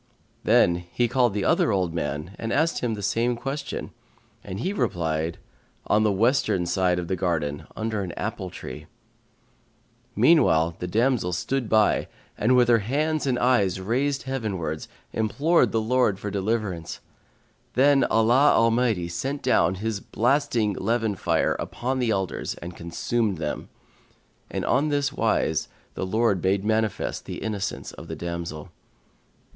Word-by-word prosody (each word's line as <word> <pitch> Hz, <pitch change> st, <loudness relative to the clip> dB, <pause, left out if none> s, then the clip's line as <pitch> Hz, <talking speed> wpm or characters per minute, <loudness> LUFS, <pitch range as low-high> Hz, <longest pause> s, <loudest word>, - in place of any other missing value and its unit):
Then 85 Hz, 0 st, +4 dB
he 120 Hz, -, +1 dB
called 120 Hz, -3 st, +2 dB
the 100 Hz, -2 st, -1 dB
other -, -, +3 dB
old 90 Hz, -4 st, 0 dB
man 75 Hz, +3 st, -4 dB
and 115 Hz, -, -3 dB
asked 160 Hz, +5 st, +1 dB
him 115 Hz, -3 st, -1 dB
the 100 Hz, -, -7 dB
same 115 Hz, +5 st, +1 dB
question, 140 Hz, +4 st, -5 dB, 0.5 s
and 95 Hz, -, -6 dB
he 185 Hz, -, -1 dB
replied, 80 Hz, -, -1 dB, 0.5 s
"On 105 Hz, -, +3 dB
the 110 Hz, -1 st, +3 dB
western 105 Hz, -3 st, +2 dB
side 90 Hz, 0 st, +1 dB
of 90 Hz, -1 st, -3 dB
the 95 Hz, -, 0 dB
garden, 80 Hz, -4 st, -2 dB
under 110 Hz, -1 st, -2 dB
an 90 Hz, -3 st, -4 dB
apple 100 Hz, -2 st, -4 dB
tree." -, -, -9 dB, 1.3 s
Meanwhile 85 Hz, -, +4 dB
the 90 Hz, -, -3 dB
damsel 115 Hz, -2 st, +1 dB
stood 120 Hz, +6 st, -2 dB
by, 110 Hz, -1 st, +3 dB, 0.4 s
with 125 Hz, +2 st, +5 dB
her 120 Hz, -1 st, +5 dB
hands 150 Hz, +7 st, -1 dB
and 125 Hz, -2 st, +1 dB
eyes 105 Hz, -8 st, +2 dB
raised 130 Hz, +8 st, 0 dB
heavenwards, 100 Hz, -12 st, -3 dB, 0.3 s
imploring 140 Hz, +10 st, +2 dB
the 115 Hz, -, 0 dB
Lord 110 Hz, -3 st, +2 dB
for 105 Hz, +1 st, -5 dB
deliverance. 100 Hz, -4 st, -2 dB, 0.8 s
Then 140 Hz, +1 st, +5 dB
Allah 120 Hz, +6 st, +4 dB
Almighty 115 Hz, -5 st, +2 dB
sent 135 Hz, +12 st, -4 dB
down 85 Hz, +3 st, +3 dB
His 105 Hz, +1 st, -3 dB
blasting 120 Hz, -3 st, +1 dB
leven 110 Hz, +2 st, 0 dB
fire 95 Hz, -, +1 dB
upon 130 Hz, +2 st, -3 dB
the 125 Hz, -2 st, +1 dB
elders 95 Hz, -3 st, -2 dB
and 85 Hz, 0 st, -9 dB
consumed 100 Hz, +4 st, -1 dB
them, 75 Hz, -2 st, -4 dB, 0.8 s
and -, -, -3 dB
on 140 Hz, +4 st, +2 dB
this 145 Hz, -1 st, 0 dB
wise 110 Hz, -, +1 dB, 0.3 s
the 95 Hz, -, -3 dB
Lord 110 Hz, -2 st, +1 dB
made 95 Hz, +1 st, +1 dB
manifest 110 Hz, -1 st, -1 dB
the -, -, -6 dB
innocence 105 Hz, -3 st, -3 dB
of -, -, -11 dB
the -, -, -5 dB
damsel. 85 Hz, -3 st, -5 dB
110 Hz, 145 wpm, -25 LUFS, 90-125 Hz, 1.3 s, with